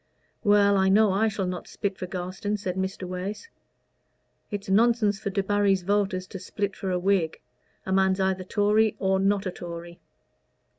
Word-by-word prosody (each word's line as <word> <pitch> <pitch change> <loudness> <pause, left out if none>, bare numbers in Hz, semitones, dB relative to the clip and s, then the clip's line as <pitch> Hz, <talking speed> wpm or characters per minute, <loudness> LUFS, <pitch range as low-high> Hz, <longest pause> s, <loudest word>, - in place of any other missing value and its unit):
"Well, 205 -1 +4
I 190 0 +3
know 210 +1 +5
I 205 +4 +2
shall 210 -3 -2
not 180 -1 -5
split 200 -1 -3
for 185 - -4
Garstin," 185 +3 -3
said 185 -3 -4
Mr. 190 0 -3
Wace. 190 - -5 1.0
"It's 205 -2 -5
nonsense 210 0 +3
for 200 - -3
Debarry's 195 -1 +1
voters 195 -1 0
to 190 - -7
split 200 +1 -3
for 195 - -4
a 180 - +1
Whig. 180 -3 +1 0.5
A 190 - -4
man's 190 0 +3
either 190 -1 +1
a - - -8
Tory 210 +2 +2
or 190 0 +1
not 195 +1 +1
a 185 - -1
Tory." 170 -1 -8
195 Hz, 170 wpm, -26 LUFS, 185-205 Hz, 1.0 s, know